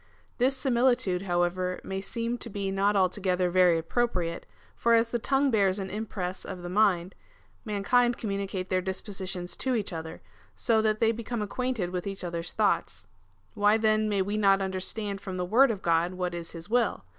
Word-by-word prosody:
This 260 +2 +2
similitude, 245 -7 +2
however, 180 0 0
may 190 0 -4
seem 230 +3 -3
to 235 - -5
be 195 -2 -3
not 200 +2 +2
altogether 185 -1 +1
very 180 -2 +5
appropriate, 170 -1 -1 0.3
for 235 0 +3
as 230 0 +3
the 240 - -1
tongue 275 +3 +2
bears 200 -3 +2
an 190 -1 -5
impress 195 -4 -4
of 180 -1 -7
the 175 - -5
mind, 185 -2 +2 0.5
mankind 240 +4 +2
communicate 195 -3 -3
their 185 0 +2
dispositions 190 -1 -4
to 260 -1 0
each 205 -5 -2
other, 160 0 -7 0.3
so 225 -3 +2
that 215 -1 0
they 225 0 +4
become 230 0 -4
acquainted 225 -4 -2
with 180 +1 -3
each 195 -1 -5
other's 170 -1 -4
thoughts. 210 -2 0 0.5
Why 205 0 +3
then 215 -1 +2
may 200 -2 +1
we 205 +2 -2
not 195 -2 +4
understand 195 +2 -2
from 190 -2 -5
the 180 - -1
word 245 +8 +5
of 205 -4 -3
God 170 +2 +1
what 180 -1 -2
is 170 -1 -6
his 165 0 -8
will? 240 +2 0
195 Hz, 180 wpm, -28 LUFS, 180-225 Hz, 0.5 s, very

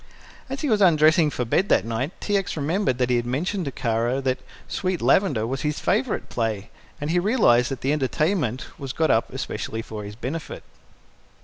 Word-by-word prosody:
As 270 +1 -4
he 300 - -1
was 215 -5 +2
undressing 155 -2 +5
for 125 -3 -3
bed 190 - +1
that - - +3
night 115 +5 -2
T. 205 - -1
X. 195 -4 -1
remembered 155 -2 0
that 125 0 +1
he 125 - +4
had 120 - -1
mentioned 175 +9 -1
to 140 - -3
Kara 120 +2 0
that 130 -1 0 0.3
"Sweet 185 -1 -2
Lavender" 140 - +3
was 130 +3 -3
his 150 0 -1
favorite 230 +3 0
play, 110 -3 -3 0.3
and 145 +2 -2
he 175 - +3
realized 175 - +3
that 135 -3 -5
the 135 +3 +1
entertainment 150 - 0
was 135 -2 -5
got 160 -1 +2
up - - +1
especially 115 0 -4
for 110 -2 -7
his 105 0 -8
benefit. 135 +8 -5
140 Hz, 195 wpm, -24 LUFS, 120-180 Hz, 0.3 s, undressing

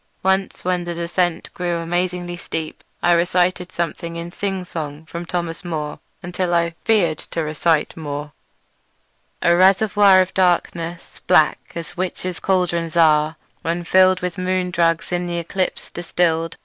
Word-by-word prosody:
Once 190 0 0
when 180 -1 0
the 175 0 -4
descent 170 0 -1
grew 175 -1 -1
amazingly 175 +1 -2
steep 160 -2 -5 0.2
I 175 - +4
recited 180 +1 +2
something 170 0 -3
in 170 +1 -5
sing 195 -1 -3
song 155 -2 -6
from 170 +2 -7
Thomas 170 -1 -3
Moore 155 -4 -4 0.2
until 175 0 -1
I 170 0 +1
feared 195 -9 +3
to 165 - -4
recite 155 +1 +1
more: 145 -2 -5 1.1
"A 170 - +5
reservoir 195 +1 +5
of 185 - -2
darkness, 175 -2 0
black - - +3
As 170 0 -7
witches' 185 0 -3
cauldrons 170 -3 0
are, 155 -1 +4 0.3
when 170 +1 -2
fill'd 185 +1 +4
With 180 0 -3
moon 185 0 0
drugs 165 -1 +1
in 175 0 -1
th' 175 0 -2
eclipse 185 +1 -2
distill'd. 165 -1 0
175 Hz, 145 wpm, -21 LUFS, 165-180 Hz, 1.1 s, A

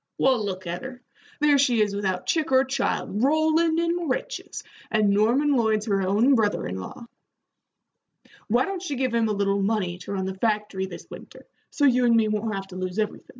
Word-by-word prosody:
"Well, 260 -4 +2
look 185 -2 -4
at 175 +1 -4
her. 255 -1 -8 0.4
There 295 -2 +4
she 250 -4 +3
is 205 -2 +1
without 190 -3 -2
chick 315 -4 0
or 260 0 +5
child, 255 -5 -2
rollin' 315 +3 +2
in 340 -1 -1
riches, - - -4 0.3
and 215 -2 +2
Norman 245 +8 +2
Lloyd's 220 -3 +1
her 200 -3 0
own 210 +8 +3
brother 220 -5 +1
in 90 +1 -5
law. 95 - -9 1.4
Why 240 +4 +2
don't 390 -2 -4
she 300 -6 -4
give 255 -2 -1
him 230 -1 +2
a - - 0
little 200 0 0
money 195 -4 -1
to 180 - -7
run 190 -1 -2
the 190 - -3
factory 210 -2 -1
this - - -10
winter, - - -12 0.2
so 290 - 0
you 250 -2 +4
and 235 -1 +4
me 225 -1 +3
won't 215 0 -2
have 195 0 -5
to 185 - -10
lose 185 +1 -4
everythin'?" 215 -1 -3
220 Hz, 200 wpm, -25 LUFS, 200-270 Hz, 1.4 s, or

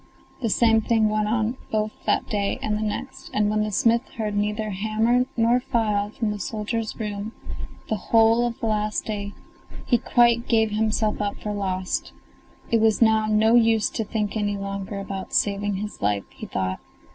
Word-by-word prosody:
The 230 - 0
same 225 +1 +4
thing 220 -1 +2
went 215 0 0
on 225 +2 0
both 215 0 0 0.2
that - - +2
day 200 -2 -1
and 210 - 0
the 210 - -2
next; 210 -1 -4
and 210 0 +2
when 215 0 +1
the 215 0 -1
smith 230 +3 +3 0.2
heard 210 -2 -2
neither 210 +1 -1
hammer 220 +5 +1
nor 235 +2 +4
file 215 -5 0
from 220 0 -2
the 210 - -5
soldier's 220 +3 -3
room 210 0 -4 0.5
the 220 - -1
whole 230 +1 +5
of 235 - -6
the - - -3
last 215 -1 0
day, 205 -1 -4 0.5
he 240 - +3
quite 235 0 +3
gave 220 -2 +3
himself 215 0 0
up 205 -1 -1
for 210 - -4
lost; 185 -2 -2 0.6
it 230 -1 +3
was 220 -1 +3
now 220 -1 +4
no 215 +1 +3
use 225 -2 +4
to 225 - -2
think 210 0 -2
any 205 -1 -1
longer 200 0 -4
about 195 -1 -6
saving 205 0 +1
his 210 +2 -6
life, 100 -1 +1
he - - -9
thought. 95 -1 -2
215 Hz, 180 wpm, -24 LUFS, 205-225 Hz, 0.6 s, whole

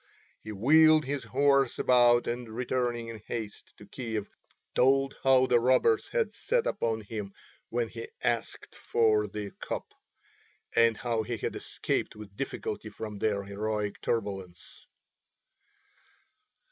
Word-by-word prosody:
He 110 - -7
wheeled 155 +8 +5
his 135 -2 -3
horse 140 +2 +2
about 120 -1 +4
and 120 -1 -4
returning 120 0 -2
in 110 -2 -8
haste 110 -3 -6
to - - -13
Kiev 110 -4 -4 0.5
told 135 +1 +3
how 130 -1 +5
the 125 -2 +4
robbers 130 - +3
had 475 -2 -1
set 485 -1 0
upon 115 - -1
him 105 -2 -6 0.4
when 120 -1 -1
he 115 +1 -8 0.2
asked 120 -1 -2
for 110 -2 +2
the 100 0 -6
cup, - - -5 0.8
and 115 -1 +4
how 115 -2 -1
he 115 +1 -4
had - - -3
escaped - - -2
with 105 -2 -11
difficulty 110 -3 -4
from 105 0 -7
their 100 -2 0
heroic 105 +1 -3
turbulence. 95 -6 -4
115 Hz, 130 wpm, -29 LUFS, 105-130 Hz, 0.8 s, wheeled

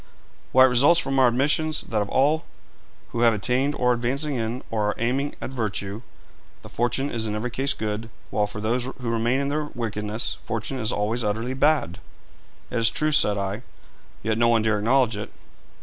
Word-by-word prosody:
'Why, 130 0 +7
it - - +4
results 140 +8 +5
from 135 -3 0
our 130 - +6
admissions 150 +5 +2
that 110 -4 -2
of 100 - -3
all 150 +4 +2 0.6
who 115 - -4
have 115 -2 +5
attained, 130 +7 0
or 125 0 +2
are - - +5
advancing 135 +5 -1
in, 120 0 -3
or 105 -2 0
are - - -2
aiming 130 +5 -1
at - - -6
virtue, 105 -3 -3 0.6
the - - -10
fortune 120 +4 -1
is 110 -1 -2
in 105 - -2
every 115 +3 -3
case 135 +3 +1
good, 110 +1 -4 0.2
while 105 -1 +1
for 105 - -7
those 120 +4 0
who 125 -2 -5
remain 115 +3 +1
in 140 - -1
their 150 +1 -1
wickedness 105 -1 -3
fortune 115 +4 -3
is 110 -2 0
always 110 +4 -1
utterly 115 +5 -1
bad.' 135 - +1 0.7
'It 120 - 0
is 115 - +4
true,' 155 0 0
said 105 -9 +3
I; 100 +2 -3 0.6
'yet 110 +1 0
no 120 - +4
one 115 -2 +3
dare 110 -1 +1
acknowledge 120 +1 +2
it.' 105 +1 -6
120 Hz, 195 wpm, -24 LUFS, 110-135 Hz, 0.7 s, Why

